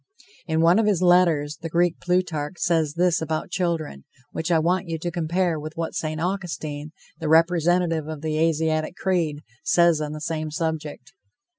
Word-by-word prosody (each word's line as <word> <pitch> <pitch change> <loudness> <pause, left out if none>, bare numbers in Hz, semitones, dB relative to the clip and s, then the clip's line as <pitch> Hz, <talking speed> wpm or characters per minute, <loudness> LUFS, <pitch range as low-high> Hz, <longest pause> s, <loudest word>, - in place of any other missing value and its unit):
In 160 -1 +1
one 170 +5 +5
of 220 - +2
his 190 -4 +2
letters, 170 -5 +3
the 165 - -4
Greek 170 +1 +1
Plutarch 180 -4 -1
says 165 -5 +1
this 175 -1 +2
about 160 +2 -3
children, 165 - -2 0.3
which 160 +1 -3
I 170 - +4
want 175 +3 +1
you 165 -1 -3
to 175 +2 -4
compare 170 0 0
with 155 +1 -7
what 165 -1 -3
St. 155 0 -3
Augustine, 160 -5 -4 0.3
the 160 -2 -2
representative 165 0 +3
of 155 -2 -6
the 155 -1 -1
Asiatic 160 0 +1
creed, 170 -7 -1 0.2
says 170 -3 +3
on 150 0 -3
the 155 - -6
same 155 0 -3
subject. 160 +1 -4
165 Hz, 170 wpm, -24 LUFS, 155-175 Hz, 0.3 s, one